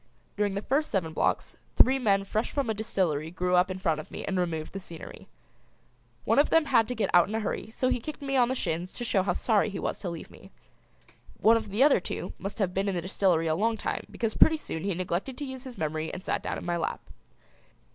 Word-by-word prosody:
During 205 -1 0
the 200 - -3
first 295 +4 +1
seven 165 -6 -1
blocks - - 0 0.2
three 265 +1 +5
men 200 -5 +2
fresh 215 +3 -1
from 275 -6 0
a - - 0
distillery 185 -8 -1
grew 180 +1 -1
up 180 +1 +4
in 185 - -3
front 165 -5 0
of 155 - -8
me - - -6
and 190 -1 -1
removed 160 -3 -2
the 195 - -4
scenery. 170 -3 -10 1.0
One 225 +5 +4
of 290 - +4
them 325 -1 +4
had 230 -6 +3
to 250 - -3
get 220 - 0
out 175 +1 +6
in 215 - -3
a - - +1
hurry 215 0 -3
so 255 +3 -1
he 245 - +1
kicked 300 +5 -7
me 275 -1 -1
on 245 -2 +4
the 260 - 0
shins 175 -4 -2
to 245 - -6
show 205 -5 +2
how 185 -1 0
sorry 215 +2 +2
he 195 - -5
was - - -3
to 185 - -4
leave 170 -2 -7
me. - - -15 0.9
One 225 +1 +6
of 225 -2 -2
the 210 +7 +3
other 285 -6 +6
two 180 0 -5
must 195 +1 -5
have 195 -5 0
been 195 +2 0
in 190 - -1
the 175 - -1
distillery 185 -3 +2
a 160 - +2
long 220 +6 +1
time - - -3
because 225 -3 -2
pretty 320 - +5
soon 160 - -5
he 200 -3 0
neglected 185 +8 -3
to 290 - -4
use 260 -1 -7
his 255 -2 -9
memory 155 0 -2
and 185 - -7
sat - - -1
down - - -3
in - - -7
my 175 -1 0
lap. 165 - -2
195 Hz, 255 wpm, -28 LUFS, 175-235 Hz, 1.0 s, out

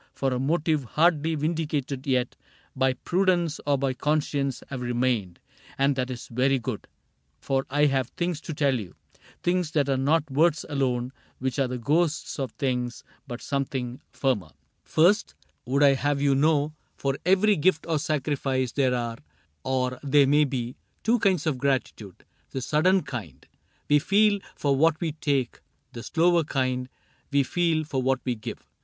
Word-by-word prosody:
For 135 -1 -1
a 125 - -1
motive 155 +1 +1
hardly 160 +4 +2
vindicated 150 -4 -2
yet 125 -2 +1 0.4
By 130 0 +2
prudence 175 +2 0
or 145 -1 +3
by 135 -1 0
conscience, 145 -1 -1
have 130 -2 -4
remained; 120 -7 -1 0.4
And 140 0 +2
that 130 -1 -2
is 125 -2 -6
very 130 +3 +2
good, 120 -3 -5 0.5
for 135 0 -1
I 145 +2 +3
have 135 -3 +1
things 175 +1 -3
To 160 - -6
tell 140 -4 +2
you: 95 -5 -9 0.5
things 175 -2 +1
that 145 -3 +2
are 135 - +2
not 145 +2 +1
words 155 +3 +2
alone 130 -3 -1 0.2
Which 130 +2 -2
are 135 - +2
the 125 0 -4
ghosts 155 +6 0
of 130 -4 -2
things 125 -3 -2
— 125 - -37
but 120 -2 -7
something 130 -3 -3
firmer. 125 - -1
CAPTAIN 75 - -26
CRAIG - - -45
5 - - -26
" - - -19
First, 190 +7 +4 0.3
would 140 +3 +2
I 140 -1 +7
have 145 +1 0
you 140 -1 +3
know, 150 +1 +2 0.2
for 135 -1 -1
every 195 +4 +4
gift 160 0 +2
Or 160 -2 +1
sacrifice, 140 -4 -1
there 130 -1 +1
are 120 -1 -3 0.3
— 75 -1 -45
or 130 -1 -1
there 145 0 +4
may 145 +2 +4
be 125 -3 -4
— - - -44
Two 235 +2 +3
kinds 185 -6 +2
of 145 -5 0
gratitude: 125 -8 -2 0.2
the 130 - -4
sudden 175 +8 +2
kind 105 - -7 0.4
We 150 0 +5
feel 205 +5 +3 0.2
for 140 -2 +1
what 160 +3 +3
we 165 -2 -1
take, 140 -5 -1 0.3
the 115 - -7
slower 170 +4 +2
kind 130 -3 -1 0.4
We 140 -1 +3
feel 165 +2 +1
for 145 -4 -2
what 130 0 +1
we 125 - +1
give. 110 -2 -8
140 Hz, 180 wpm, -26 LUFS, 130-155 Hz, 0.5 s, I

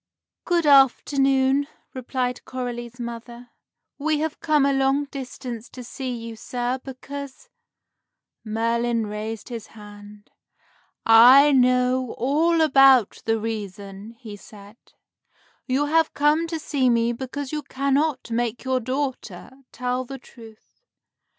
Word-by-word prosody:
"Good 345 -2 +1
afternoon," 270 0 +3 0.3
replied 250 -1 -3
Coralie's 245 -1 -6
mother; 235 +1 -8 0.5
"we 310 +1 0
have 315 +1 -3
come 300 -3 +2
a 280 - +2
long 270 +1 +1
distance 255 -4 -8
to 250 - -10
see 260 +2 -6
you, 230 -2 -6
sir, 245 +3 -3
because 280 - -9 0.5
" - - -61
Merlin 230 0 0
raised 210 +2 -6
his 230 -3 -7
hand. 205 0 -13 0.7
"I 250 +6 +8
know 255 -1 +2
all 320 +6 +2
about 270 -6 +5
the 225 0 +1
reason," 205 -1 -6
he 215 -4 -9
said. 205 +1 -15 0.9
"You 270 +3 +1
have 320 +2 +1
come 300 +3 +2
to 330 0 -3
see 280 -4 0
me 235 0 +2
because 265 +3 -6
you 305 -1 -3
cannot 280 -1 -1
make 235 0 -2
your 260 -1 0
daughter 255 -7 -4 0.2
tell 250 0 -2
the 270 +2 -8
truth. 225 - -17
255 Hz, 125 wpm, -23 LUFS, 230-275 Hz, 0.9 s, I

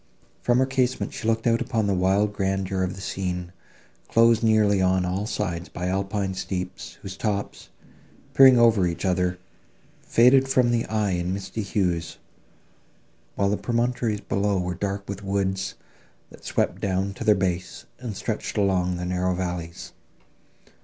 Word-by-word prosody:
From 120 0 +2
her 130 - +4
casement 130 -1 -1
she 110 - -5
looked 115 0 +1
out 115 -1 +2
upon 115 -4 0
the 100 - +1
wild 95 +3 +2
grandeur 95 -1 -1
of 95 0 -1
the 95 - -9
scene, 90 -2 -3 0.6
closed 115 -1 +4
nearly 110 -3 +3
on 95 0 +2
all 95 +4 -2
sides 90 -6 -3
by 90 +1 -4
alpine 95 0 -1
steeps, 90 -1 -5
whose 95 -1 -6
tops, 100 0 -3 0.6
peeping 130 -2 +8
over 115 -6 +5
each 85 +3 -3
other, 90 -1 +1 0.6
faded 130 +3 +4
from 125 -2 +3
the 120 -1 0
eye 105 -2 0
in 90 0 -1
misty 100 +3 -5
hues, 90 -5 -1 1.2
while 100 0 +1
the 105 - +1
promontories 120 -3 -1
below 100 0 0
were 90 0 -2
dark 100 +2 -4
with 100 0 -6
woods, 95 -1 -1 0.6
that - - -15
swept - - -1
down 95 0 -1
to - - -7
their 105 - +5
base, 95 -1 -3
and 115 -6 -6
stretched 110 0 -4
along 95 -3 +1
the 90 0 -4
narrow 90 0 0
valleys. 90 -2 -5
100 Hz, 155 wpm, -25 LUFS, 90-110 Hz, 1.2 s, peeping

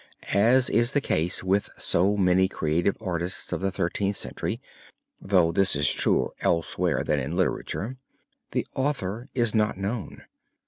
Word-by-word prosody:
As 120 +6 +4
is 120 +4 +2
the 145 - +4
case 90 - 0
with 95 +2 +1
so 100 +4 +1
many 95 -1 +4
creative 85 +2 0
artists 90 -3 -3
of - - -2
the 95 - +1
Thirteenth 95 +2 -1
Century, - - -4 0.6
though 90 -4 +3
this 95 0 +2
is 70 -1 +3
truer - - +2
elsewhere 85 0 0
than 75 - 0
in 70 +6 -3
literature, 125 +6 -2 0.5
the - - -1
author 130 -4 -2
is 120 -4 +2
not 110 -3 +1
known. 100 +3 -4
95 Hz, 145 wpm, -26 LUFS, 85-110 Hz, 0.6 s, As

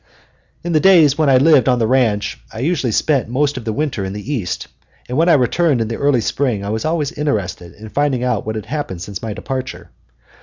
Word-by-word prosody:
In 175 - -3
the 155 - +3
days 165 -6 +5
when 155 -2 +2
I 130 - +6
lived 140 -1 +4
on 125 - +3
the 115 - +1
ranch 110 -4 +1
I - - -10
usually 140 -5 0
spent 135 +2 +1
most 145 +3 0
of 125 -2 -7
the 110 - -1
winter 140 -4 -2
in 95 0 -4
the 105 +8 -5
East, 105 -10 -3 0.4
and 125 - -4
when 165 +4 +3
I - - +6
returned 145 +1 +2
in 110 -1 -1
the 115 - -3
early 140 -4 +2
spring 115 -4 -1
I - - -4
was 110 +1 -2
always 155 -3 -1
interested 105 - -3
in 110 +1 -11
finding 140 -1 0
out 125 - 0
what 110 0 -4
had 110 - -5
happened 120 - -4
since 100 0 -7
my 110 -2 -4
departure. 130 +5 -6
130 Hz, 230 wpm, -18 LUFS, 110-150 Hz, 0.4 s, I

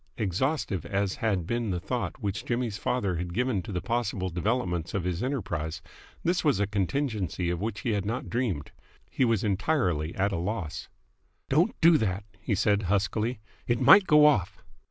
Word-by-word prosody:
Exhaustive 110 - -1
as 100 -1 -1
had 100 -6 0
been 120 +2 -1
the 90 -2 -1
thought 125 +8 -3
which 100 -3 -2
Jimmy's 120 -4 -2
father 100 -8 -1
had 85 +1 -4
given 125 -4 +1
to 90 - -8
the 90 -2 -3
possible 105 -6 -1
developments 90 -3 -1
of 95 - -1
his 90 0 -2
enterprise, 85 - -3 0.4
this 175 +1 +1
was 145 - +2
a 100 - +2
contingency 100 - -1
of 90 0 -3
which 110 0 -3
he 120 - -1
had 100 -2 0
not 115 +5 -3
dreamed. 110 - -2 0.4
He 130 - +2
was 115 -4 +1
entirely 95 - 0
at 100 +2 +1
a 100 - -1
loss. 90 -2 -4 0.6
"Don't - - +2
do 165 -1 +6
that!" 100 -3 -1 0.2
he 105 - -1
said 100 +1 +2
huskily. 105 +4 0 0.3
"It 120 -2 +1
might 185 +9 +7
go 150 0 +7
off!" 105 - +2
105 Hz, 175 wpm, -28 LUFS, 90-120 Hz, 0.6 s, might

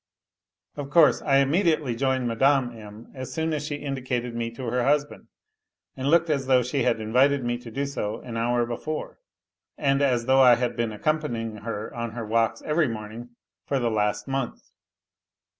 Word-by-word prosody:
Of 140 -1 -5
course, 155 +2 +5
I 140 - +2
immediately 150 - +2
joined 130 0 0
Mme. 130 +1 +2
M. 105 +1 -12
as 130 -1 -7
soon 160 0 -1
as 150 -1 -3
sh 150 - -3
indicated 130 -4 -3
me 115 0 -2
to 130 - -6
her 120 +1 0
husband, 145 +2 0 0.7
and 135 +1 -2
looked 170 +1 +4
as 140 -3 -1
though 130 -2 +4
she 130 +3 -1
ha - - +3
invited 125 +5 +2
me 120 0 -1
to 120 -1 -10
do 140 +5 -2
so 110 -6 -3
an 120 -2 -8
hour 120 +1 +1
before, 135 +6 -5 0.6
and 140 -1 +1
as 125 -4 +2
though 130 +1 +5
I 125 -2 +8
had 120 0 -2
bee 120 0 0
accompanying 115 -1 -2
her 110 0 -5
on 115 -2 -4
her 115 -1 -5
walks 115 +1 0
every 155 0 +1
morning 115 +1 -7 0.3
for 140 - 0
the 120 -3 0
lag 105 -1 +1
month. 135 -2 -4
125 Hz, 180 wpm, -25 LUFS, 115-140 Hz, 0.7 s, I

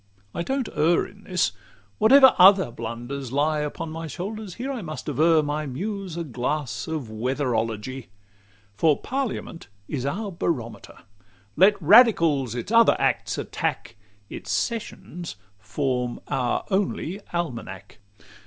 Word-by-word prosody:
I - - -3
don't 265 +5 -2
err 160 +3 +3
In 205 +1 -15
this: 180 -8 +1 0.5
whatever 265 +4 +7
other 190 -6 +7
blunders 120 +3 -6
lie 150 +3 +1
Upon 150 +2 -4
my 165 +1 -6
shoulders, 195 - -6
here 260 +3 -4
I 250 - -5
must 155 -3 -7
aver 155 +2 +3
My 150 +1 -2
Muse 190 +5 -5
a 170 - -2
glass 140 0 -3
of 155 -8 -4
Weatherology; 120 0 -2 0.7
For 150 +8 +3
parliament 255 - -4 0.2
is 135 -4 -3
our 195 +9 -3
barometer: 140 -9 -4 0.5
Let 200 +2 +5
radicals 165 - +5
its 120 - -5
other 230 0 +6
acts - - 0
attack, - - -3 0.3
Its - - -9
sessions 190 -6 -4 0.2
form 125 0 -2
our 125 -2 0
only 195 -1 -1
almanack. 115 - -5
155 Hz, 125 wpm, -24 LUFS, 130-195 Hz, 0.7 s, whatever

